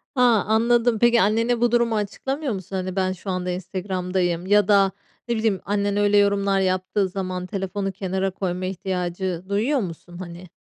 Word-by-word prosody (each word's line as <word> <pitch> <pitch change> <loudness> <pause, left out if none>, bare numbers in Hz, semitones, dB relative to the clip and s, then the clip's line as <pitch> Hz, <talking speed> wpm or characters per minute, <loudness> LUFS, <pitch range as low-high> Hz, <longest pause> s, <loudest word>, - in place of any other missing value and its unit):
A, 250 - +2 0.3
anladım. 230 +1 +3
Peki, 240 0 +5
annene 230 +4 +2
bu 240 -1 +3
durumu 235 -1 +2
açıklamıyor 265 +6 -2
musun? 195 0 -6
Hani, 185 0 -3
"Ben 185 -1 +1
şu 190 +2 -7
anda 180 -1 -2
Instagram'dayım." 180 -1 -2
ya 205 0 +4
da 200 -2 +4 0.4
ne 235 - 0
bileyim 220 -4 0
annen 200 0 0
öyle 205 0 +3
yorumlar 200 -1 +3
yaptığı 185 +1 0
zaman 185 -1 -4
telefonu 195 0 -3
kenara 190 0 -2
koyma 185 -1 -3
ihtiyacı 185 -1 -3
duyuyor 230 +8 +1
musun 175 -3 -7
hani? 175 0 -9
195 Hz, 165 wpm, -23 LUFS, 185-210 Hz, 0.4 s, Peki